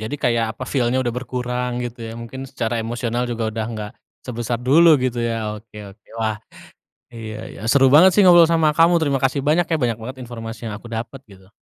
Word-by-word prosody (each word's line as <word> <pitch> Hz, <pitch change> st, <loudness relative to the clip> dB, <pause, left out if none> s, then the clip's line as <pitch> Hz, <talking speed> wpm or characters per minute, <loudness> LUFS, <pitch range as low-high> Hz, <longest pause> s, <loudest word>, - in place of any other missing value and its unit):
Jadi 110 Hz, +6 st, -4 dB
kayak 115 Hz, -2 st, +1 dB
apa, 130 Hz, -, -6 dB
feel-nya 130 Hz, -1 st, +1 dB
udah 120 Hz, -2 st, -1 dB
berkurang 125 Hz, 0 st, -3 dB
gitu 120 Hz, -1 st, -6 dB
ya, 115 Hz, -, -6 dB
mungkin 115 Hz, +3 st, -8 dB
secara 120 Hz, -3 st, -3 dB
emosional 120 Hz, +1 st, -2 dB
juga 115 Hz, -2 st, -2 dB
udah 110 Hz, 0 st, -3 dB
nggak, 105 Hz, -2 st, -6 dB, 0.3 s
sebesar 120 Hz, -1 st, -4 dB
dulu 150 Hz, +4 st, +5 dB
gitu 125 Hz, -1 st, -1 dB
ya. 110 Hz, -2 st, -3 dB
Oke 105 Hz, 0 st, -14 dB
oke. 105 Hz, +1 st, -28 dB
Wah, 110 Hz, -1 st, -1 dB, 0.8 s
iya 110 Hz, -2 st, -7 dB
iya. -, -, -12 dB
Seru 135 Hz, +1 st, +4 dB
banget 180 Hz, +6 st, +8 dB
sih 210 Hz, -, +6 dB
ngobrol 175 Hz, -2 st, +7 dB
sama 160 Hz, -2 st, +3 dB
kamu. 170 Hz, +1 st, +5 dB
Terima 140 Hz, -4 st, 0 dB
kasih 135 Hz, +1 st, 0 dB
banyak 160 Hz, +3 st, +2 dB
ya. 165 Hz, -, +1 dB
Banyak 115 Hz, -2 st, 0 dB
banget 130 Hz, +4 st, -7 dB
informasi 115 Hz, -1 st, -8 dB
yang 105 Hz, -, -5 dB
aku 120 Hz, -, -12 dB
dapet, 115 Hz, +3 st, -6 dB
gitu. 95 Hz, -1 st, -18 dB
120 Hz, 205 wpm, -21 LUFS, 115-135 Hz, 0.8 s, banget